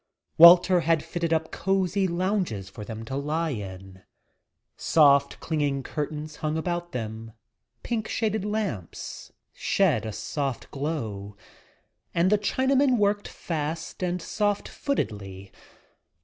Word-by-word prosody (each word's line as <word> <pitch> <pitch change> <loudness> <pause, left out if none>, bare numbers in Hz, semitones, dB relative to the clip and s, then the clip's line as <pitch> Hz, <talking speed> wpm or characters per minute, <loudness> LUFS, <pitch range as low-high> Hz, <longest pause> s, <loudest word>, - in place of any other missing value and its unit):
Walter 175 +2 +9
had 165 -1 +2
fitted 170 -2 -3
up 160 0 0
cosy 190 0 +1
lounges 175 - -1
for 110 - -9
them 110 +1 -7
to 130 - -5
lie 155 +3 -1
in. 95 -4 -7 0.7
Soft, 140 -3 +4
clinging 145 -4 -1
curtains 150 +2 -5
hung 155 0 -2
about 175 +1 -3
them, 110 -1 -5 0.5
pink 225 -3 -2
shaded 220 -2 -1
lamps 205 - -4 0.2
shed 145 - +1
a - - -3
soft 135 +3 -4
glow, 110 -9 -4 0.8
and 175 +3 +3
the 210 - +4
Chinaman 260 +4 +2
worked 205 -1 +1
fast 160 +1 -4
and 180 -1 -1
soft 205 -1 -1
footedly. 100 - -4
160 Hz, 120 wpm, -26 LUFS, 120-190 Hz, 0.8 s, Walter